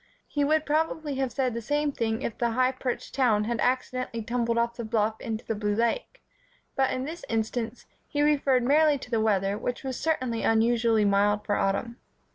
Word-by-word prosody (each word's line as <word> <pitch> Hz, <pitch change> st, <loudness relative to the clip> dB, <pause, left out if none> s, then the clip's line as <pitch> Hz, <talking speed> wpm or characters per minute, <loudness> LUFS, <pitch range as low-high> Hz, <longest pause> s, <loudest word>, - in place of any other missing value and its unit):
He 290 Hz, -, -1 dB
would 310 Hz, +2 st, +2 dB
probably 310 Hz, 0 st, 0 dB
have 265 Hz, -2 st, -1 dB
said 255 Hz, -2 st, 0 dB
the 235 Hz, -, -3 dB
same 290 Hz, +5 st, 0 dB
thing 225 Hz, -4 st, -2 dB
if 225 Hz, -, -3 dB
the 235 Hz, -, 0 dB
high 255 Hz, +1 st, +3 dB
perched 255 Hz, -1 st, -4 dB
town 235 Hz, -6 st, +3 dB
had 230 Hz, +2 st, -2 dB
accidentally 255 Hz, -2 st, -1 dB
tumbled 235 Hz, 0 st, -1 dB
off 235 Hz, 0 st, +1 dB
the 235 Hz, -, -5 dB
bluff 220 Hz, -1 st, 0 dB
into 225 Hz, -1 st, -4 dB
the -, -, -1 dB
blue 210 Hz, -1 st, -1 dB
lake; 235 Hz, -, -1 dB, 0.5 s
but 265 Hz, -1 st, +2 dB
in 255 Hz, -, -2 dB
this 335 Hz, +4 st, -7 dB
instance, 225 Hz, +1 st, -2 dB, 0.2 s
he 290 Hz, 0 st, 0 dB
referred 275 Hz, -4 st, +3 dB
merely 295 Hz, +3 st, +4 dB
to 255 Hz, -2 st, -11 dB
the 225 Hz, -2 st, +2 dB
weather, 200 Hz, -1 st, +1 dB
which 245 Hz, +3 st, -3 dB
was 260 Hz, -2 st, -4 dB
certainly 255 Hz, -8 st, -1 dB
unusually 225 Hz, -1 st, +3 dB
mild 205 Hz, +1 st, +2 dB
for 205 Hz, -, 0 dB
autumn. 200 Hz, +5 st, -1 dB
240 Hz, 195 wpm, -27 LUFS, 220-270 Hz, 0.5 s, merely